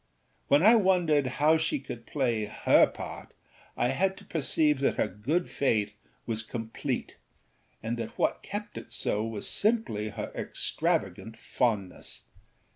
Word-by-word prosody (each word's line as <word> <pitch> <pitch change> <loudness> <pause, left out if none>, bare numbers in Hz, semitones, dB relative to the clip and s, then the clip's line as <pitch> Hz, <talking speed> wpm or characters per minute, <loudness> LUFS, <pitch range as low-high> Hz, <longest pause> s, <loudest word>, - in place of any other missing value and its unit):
When 145 +4 +4
I 220 +4 +8
wondered 175 - +3
how 150 +6 +3
she 160 -1 0
could 120 -3 -9
play 120 -7 0
her 105 - +4
part - - -9 0.4
I 120 - +2
had 190 +8 +1
to - - -14
perceive 150 -2 +1
that 140 - +1
her - - +1
good 140 - -1
faith 105 -6 0 0.3
was 110 -2 -1
complete 115 0 -4 0.7
and 115 +2 -2
that 115 -1 -6
what - - +1
kept - - -6
it - - -14
so 105 - -1
was 110 -2 -2
simply 205 - +1
her - - -6
extravagant 110 0 -2
fondness. 105 -6 -2
125 Hz, 140 wpm, -28 LUFS, 110-160 Hz, 0.7 s, I